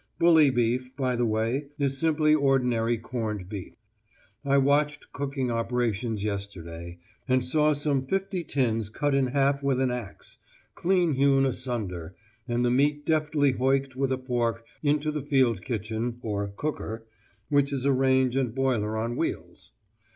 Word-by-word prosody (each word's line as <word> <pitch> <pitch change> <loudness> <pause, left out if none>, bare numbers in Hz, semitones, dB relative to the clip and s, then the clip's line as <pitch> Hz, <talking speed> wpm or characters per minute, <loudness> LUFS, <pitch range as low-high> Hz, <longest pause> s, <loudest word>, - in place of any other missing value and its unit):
Bully 160 -4 +6
beef, 125 +1 0
by 130 -2 0
the 120 0 +1
way, 115 +6 -1
is 140 -2 0
simply 155 -1 +3
ordinary 125 -5 +2
corned 110 -5 -4
beef. 100 -2 -7 0.7
I 140 -1 +3
watched 145 +2 +1
cooking 135 -3 -2
operations 115 -2 -1
yesterday, 90 -5 -5 0.3
and 130 -1 +2
saw 150 +3 +3
some 140 -2 -1
fifty 195 0 -1
tins 115 -8 0
cut 145 +6 -1
in 135 -1 +2
half 140 +2 +1
with 135 -2 +1
an 130 -1 +1
axe, 120 -5 -7 0.3
clean 180 -3 +2
hewn 135 0 +3
asunder, 105 -10 -3 0.3
and 120 0 0
the 120 - +2
meat 145 +3 +2
deftly 150 -3 +2
hoicked 135 +1 0
with 135 0 0
a 130 - +1
fork 120 -3 -2 0.2
into 150 +1 +1
the 150 -1 -3
field 130 - +2
kitchen, 115 +1 -3
or 100 -2 -2
'cooker,' 115 0 -5 0.4
which 145 -1 +2
is 135 -1 -2
a 140 - +4
range 130 -1 +2
and 130 -3 0
boiler 115 -5 0
on 115 +2 -2
wheels. - - -4
130 Hz, 150 wpm, -27 LUFS, 115-140 Hz, 0.7 s, Bully